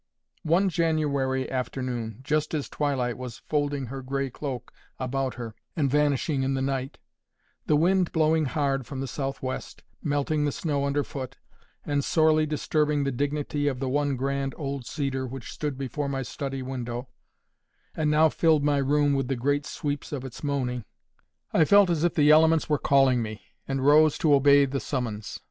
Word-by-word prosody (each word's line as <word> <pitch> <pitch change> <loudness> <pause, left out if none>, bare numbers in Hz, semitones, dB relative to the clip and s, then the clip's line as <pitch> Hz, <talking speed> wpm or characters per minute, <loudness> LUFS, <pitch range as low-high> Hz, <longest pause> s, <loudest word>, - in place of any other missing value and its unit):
One 170 +5 +2
January 145 -6 0
afternoon, 125 -3 -3
just 155 +2 0
as 145 - -2
twilight 130 -5 -1
was 125 -3 -6
folding 145 -2 0
her 135 +3 -6
gray 135 0 -2
cloak 135 -2 -6 0.2
about 130 0 -2
her, 115 -2 -6 0.2
and 140 -5 +1
vanishing 145 0 +1
in 135 +1 0
the 135 - -1
night, 135 0 -2 0.7
the 150 - +4
wind 180 +3 +3
blowing 160 -1 +2
hard 135 -2 -1
from 135 - -6
the 135 - -2
south 135 0 -4
west, 130 0 -5 0.2
melting 145 +1 0
the 145 - +1
snow 140 -2 -1
under 140 +1 +1
foot, 130 -3 -7 0.5
and 145 -1 0
sorely 155 0 +3
disturbing 150 -1 0
the 140 - 0
dignity 145 +2 -1
of 130 -3 -1
the 135 - -2
one 145 0 +1
grand 135 +1 -2
old 140 -4 -4
cedar 135 -3 -2
which 130 -1 -7
stood 145 -3 -4
before 140 +2 -3
my 135 -1 -2
study 135 +2 -5
window, 125 -1 -5 0.9
and 155 -1 0
now 155 +1 +5
filled 155 -1 +2
my 145 -1 +2
room 145 +1 +2
with 135 -2 0
the 135 - -1
great 145 +4 0
sweeps 145 -1 -4
of 135 -3 -4
its 130 +2 -9
moaning, 130 -4 -1 0.7
I 160 - +5
felt 200 +2 +5
as 165 -2 0
if 175 - +1
the 150 0 +5
elements 160 +1 +5
were 150 -2 +1
calling 135 -3 +4
me, 110 -3 -6 0.2
and 135 -1 -1
rose 150 +1 +6
to 155 -3 +3
obey 140 0 +6
the 135 +1 -2
summons. 115 -7 -4
140 Hz, 175 wpm, -26 LUFS, 130-150 Hz, 0.9 s, rose